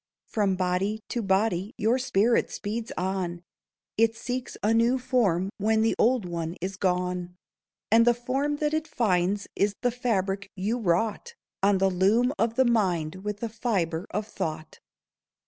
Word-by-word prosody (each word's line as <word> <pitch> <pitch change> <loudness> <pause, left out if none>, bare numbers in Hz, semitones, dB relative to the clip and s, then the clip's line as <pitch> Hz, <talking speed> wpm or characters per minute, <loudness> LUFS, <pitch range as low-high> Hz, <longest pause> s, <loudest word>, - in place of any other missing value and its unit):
From 200 -3 0
body 185 +4 -1
to 240 - -1
body 195 +1 0
your 225 +5 +2
spirit 235 -2 +2
speeds 220 +2 -4
on; 180 -2 -2 0.6
It 225 0 +4
seeks 250 +2 -4
a 215 +2 +3
new 235 +3 +3
form 210 -8 +1
when 220 +2 +2
the 225 - +2
old 240 -3 +3
one 170 -1 -4
is 190 +2 -4
gone; 180 -1 -1 0.6
And 230 +1 +6
the 240 - +5
form 270 +5 -1
that 300 +1 -1
it 315 0 -1
finds 200 -3 +1
is 200 0 +1
the 245 - +3
fabric 200 -5 -1
you 210 +6 -1
wrought 220 - 0 0.3
On 200 0 +4
the 190 0 +2
loom 215 +8 +3
of 230 0 +1
the 260 - +4
mind, 185 -8 +1
with 210 0 -4
the 230 - -2
fibre 195 -7 -1
of 210 0 -2
thought. 160 -6 -5
210 Hz, 160 wpm, -27 LUFS, 185-235 Hz, 0.6 s, And